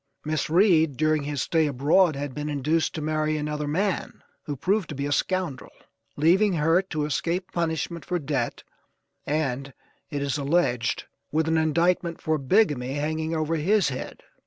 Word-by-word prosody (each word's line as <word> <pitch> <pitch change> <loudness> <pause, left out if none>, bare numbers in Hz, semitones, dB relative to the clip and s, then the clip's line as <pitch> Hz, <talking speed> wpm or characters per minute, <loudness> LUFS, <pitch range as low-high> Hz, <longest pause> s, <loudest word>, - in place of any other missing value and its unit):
Miss 155 -1 -1
Reed, 165 - +4
during 155 -1 +1
his 145 -2 -2
stay 160 -2 +2
abroad, 150 +5 +3
had 140 -1 -4
been 150 +2 -4
induced 150 +3 0
to 155 - -3
marry 155 0 0
another 150 0 -3
man 185 +6 -2 0.2
who 145 - -3
proved 190 +7 0
to 150 - -5
be 140 +1 -3
a 145 - -2
scoundrel; 175 -2 -1 0.5
leaving 185 +7 +4
her 165 +2 +3
to 160 -6 -3
escape 170 +5 -2
punishment 170 0 -2
for 180 - -1
debt, 140 -6 -2 0.6
and, 140 -2 -2 0.3
it 145 -1 -3
is 140 +1 -1
alleged, 140 -6 +1 0.3
with 160 +1 +1
an 160 0 +2
indictment 170 +2 +1
for 155 -1 0
bigamy 135 - +2
hanging 155 +2 -2
over 160 +1 0
his 190 +1 +2
head. 130 - -6
155 Hz, 160 wpm, -25 LUFS, 145-170 Hz, 0.6 s, Reed